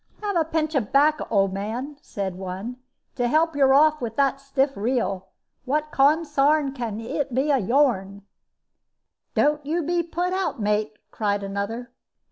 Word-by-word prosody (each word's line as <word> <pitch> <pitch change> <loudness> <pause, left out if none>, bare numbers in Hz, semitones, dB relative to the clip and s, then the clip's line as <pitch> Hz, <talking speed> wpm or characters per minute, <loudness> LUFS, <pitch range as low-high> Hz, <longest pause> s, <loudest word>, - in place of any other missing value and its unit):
"Have 405 -2 -1
a 335 - +3
pinch 315 0 -1
of 250 -8 -1
'bacco, 300 +2 +3
old 195 -3 +2
man," 230 +9 -4
said 195 -2 -4
one, 190 +6 -6 0.4
"to 245 -2 0
help 315 +4 +2
you 270 -2 +4
off 305 +2 +5
with 225 -2 -4
that 275 -1 +2
stiff 275 0 0
reel. 200 -4 -1 0.4
What 300 +3 -1
consarn 290 0 +3
can 235 -6 -4
he 230 +6 -2
be 265 +5 +1
of 260 -9 +1
yourn?" 205 -7 +1 1.1
"Don't 295 0 +2
you 325 +4 -1
be 345 +3 +1
put 345 +2 -2
out, 355 -9 -1
mate," 210 0 0
cried 205 -2 -1
another. 200 +5 -4
270 Hz, 155 wpm, -24 LUFS, 210-300 Hz, 1.1 s, off